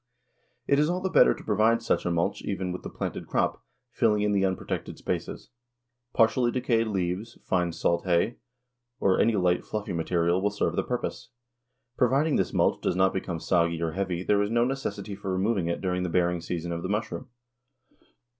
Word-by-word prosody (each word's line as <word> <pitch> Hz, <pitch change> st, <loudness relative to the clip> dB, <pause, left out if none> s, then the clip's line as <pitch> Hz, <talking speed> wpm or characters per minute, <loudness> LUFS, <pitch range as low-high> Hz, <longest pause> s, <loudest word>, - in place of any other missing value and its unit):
It 140 Hz, -, +3 dB
is 150 Hz, +1 st, +3 dB
all 180 Hz, +1 st, 0 dB
the 190 Hz, 0 st, -2 dB
better -, -, +6 dB
to -, -, -12 dB
provide 110 Hz, +2 st, +2 dB
such 90 Hz, -6 st, 0 dB
a -, -, +2 dB
mulch 85 Hz, 0 st, 0 dB
even 95 Hz, -2 st, -3 dB
with 90 Hz, -, -5 dB
the -, -, -7 dB
planted -, -, -5 dB
crop, -, -, 0 dB, 0.3 s
filling 105 Hz, -4 st, +2 dB
in 105 Hz, -, +2 dB
the 100 Hz, -1 st, +2 dB
unprotected 95 Hz, -1 st, -2 dB
spaces. -, -, -4 dB, 0.6 s
Partially 120 Hz, +2 st, +3 dB
decayed 120 Hz, -3 st, +1 dB
leaves, 95 Hz, +2 st, -2 dB
fine 90 Hz, -2 st, 0 dB
salt 85 Hz, +1 st, 0 dB
hay, 90 Hz, +6 st, +1 dB, 0.6 s
or 95 Hz, -1 st, +3 dB
any 115 Hz, -1 st, +3 dB
light, 90 Hz, -2 st, +2 dB
fluffy 105 Hz, -3 st, -4 dB
material 85 Hz, +1 st, +1 dB
will 105 Hz, -, +2 dB
serve 100 Hz, -, -1 dB
the -, -, +2 dB
purpose. 125 Hz, -1 st, -4 dB, 0.7 s
Providing 135 Hz, +5 st, +3 dB
this 95 Hz, -, 0 dB
mulch -, -, +1 dB
does -, -, 0 dB
not 95 Hz, +1 st, +3 dB
become 90 Hz, -3 st, -3 dB
soggy 85 Hz, 0 st, +1 dB
or 85 Hz, -1 st, -1 dB
heavy 90 Hz, -1 st, -2 dB
there 100 Hz, +1 st, +2 dB
is 100 Hz, -, 0 dB
no 120 Hz, +1 st, +2 dB
necessity 130 Hz, -5 st, -3 dB
for 95 Hz, -1 st, -5 dB
removing 95 Hz, -1 st, 0 dB
it 85 Hz, -, -2 dB
during 90 Hz, -1 st, -1 dB
the 90 Hz, -, -1 dB
bearing 90 Hz, 0 st, +1 dB
season 85 Hz, 0 st, -4 dB
of 85 Hz, 0 st, -3 dB
the 95 Hz, -, -4 dB
mushroom. 105 Hz, +5 st, -3 dB
95 Hz, 190 wpm, -27 LUFS, 90-115 Hz, 0.7 s, better